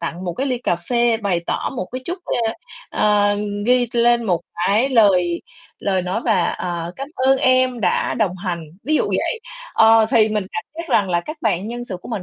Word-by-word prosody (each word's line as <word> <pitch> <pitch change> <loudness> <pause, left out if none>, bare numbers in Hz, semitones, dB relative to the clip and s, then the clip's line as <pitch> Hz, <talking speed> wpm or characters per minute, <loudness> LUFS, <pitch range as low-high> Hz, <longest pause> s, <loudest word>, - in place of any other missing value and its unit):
tặng 170 +2 -5
một 175 - -2
cái 270 - -2
ly 255 -2 -1
cà 175 -8 0
phê 235 +5 +1
bày 200 -6 -1
tỏ - - -2
một 180 - -3
cái 255 - -4
chút 355 +2 -4
ơ, 225 -1 0 0.4
ơ, 205 -1 +2 0.3
ghi 245 -1 +3
lên 240 0 +3
một 175 -5 +1 0.3
cái 220 +7 +3
lời 185 -8 +3 0.4
lời 190 -2 0
nói 185 +5 -2
và, 205 -7 +2
"Ờ, 170 -1 -4
cám 275 +1 -6
ơn 265 +1 +3
em 255 -1 +2
đã 180 -4 +1
đồng 200 -6 0
hành", 175 -3 -4 0.2
ví 310 - +1
dụ - - +3
vậy. 465 - -1 0.3
Ờ, 225 0 +6
thì 220 -1 +4
mình 210 -3 -2
cảm 175 - -4
giác 335 0 -7
rằng 195 -3 +2
là 175 0 +2
các 305 - -7
bạn 190 +5 0
nhân 240 +1 -5
sự 190 -6 -5
của - - -10
mình 220 -6 -3
215 Hz, 215 wpm, -20 LUFS, 180-245 Hz, 0.4 s, Ờ